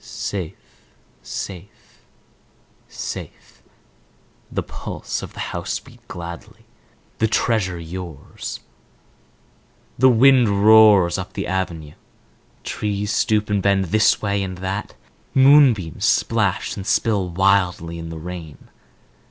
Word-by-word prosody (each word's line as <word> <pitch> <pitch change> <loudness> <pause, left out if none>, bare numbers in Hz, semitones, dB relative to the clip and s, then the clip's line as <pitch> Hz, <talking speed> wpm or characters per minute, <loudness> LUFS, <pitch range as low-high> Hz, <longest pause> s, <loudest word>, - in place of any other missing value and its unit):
"Safe, 90 -6 -5 0.7
safe, 95 +1 -9 0.9
safe," - - -8 0.9
the - - -2
pulse - - -6
of - - -9
the - - -11
house - - -3
beat - - -17
gladly. 85 0 -9 0.5
"The 110 - +3
Treasure 110 -5 0 2.2
yours."The 130 +1 +6
wind 120 -5 +4
roars 105 -5 +6
up 95 - -7
the 100 - -3
avenue. 85 -6 -3 0.7
Trees 105 0 -3
stoop 110 -2 +1
and 100 -1 +1
bend 100 0 +2
this 110 0 +3
way 100 -1 0
and 95 -1 -4
that. 95 +3 -4 0.4
Moonbeams 130 - +5
splash - - +1
and 95 0 -7
spill 100 -2 +1
wildly 90 -2 +1
in 80 0 -7
the 80 - -7
rain. 85 -2 -9
100 Hz, 105 wpm, -21 LUFS, 90-110 Hz, 2.2 s, yours."The